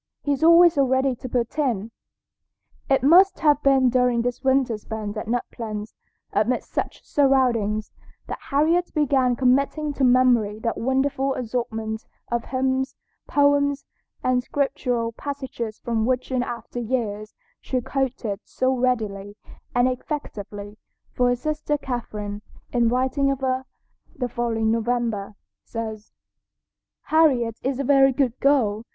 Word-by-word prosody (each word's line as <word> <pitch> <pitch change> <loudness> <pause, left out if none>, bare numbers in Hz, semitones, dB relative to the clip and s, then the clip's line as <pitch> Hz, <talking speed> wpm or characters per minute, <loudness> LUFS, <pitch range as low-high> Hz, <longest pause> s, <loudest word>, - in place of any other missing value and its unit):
He's 285 +1 0
always 335 +1 +7
so 280 - +3
ready 260 0 +2
to 255 - -7
put 240 +4 -2
in." 230 -7 0 1.0
It 270 -2 +3
must 360 +7 +6
have 295 -2 +4
been 270 -2 +4
during 250 -1 +2
this 245 +2 -3
winter 265 -3 +2
spent 215 -1 -5
at 215 - -5
Nut 240 +1 -1
Plains, 215 -2 -6 0.4
amid 220 +5 +1
such - - -4
surroundings, 245 -7 +2 0.3
that - - -6
Harriet 325 +5 +2
began 265 -4 +2
committing 275 +4 +1
to 275 - -2
memory 245 -4 +4
that 230 0 -2
wonderful 265 +2 0
assortment 225 -2 -3 0.3
of 235 -1 -1
hymns, 260 0 -1 0.3
poems, 285 -1 +2 0.4
and 255 0 +2
scriptural 245 -4 -1
passages 255 -4 -5
from 225 -1 -1
which 255 +1 -1
in 255 -1 +1
after 245 0 -5
years 215 -3 -3 0.2
she 255 - -2
quoted 250 -5 -2
so 260 0 0
readily 215 -5 -1 0.4
and 245 +1 +4
effectively, 215 -6 -5 0.3
for 250 - +1
her 245 - +2
sister 300 +2 -2
Catherine, 210 -6 -5 0.3
in 240 -1 +3
writing 260 +3 +1
of 275 -1 -2
her 260 0 -1 0.5
the 250 -2 -2
following 225 -2 -1
November, 230 -3 -1 0.3
says: 220 -2 -6 1.0
"Harriet 255 -8 +3
is 265 0 -1
a - - 0
very 270 0 +5
good 255 -2 0
girl. 230 -7 +2
250 Hz, 135 wpm, -23 LUFS, 230-275 Hz, 1.0 s, always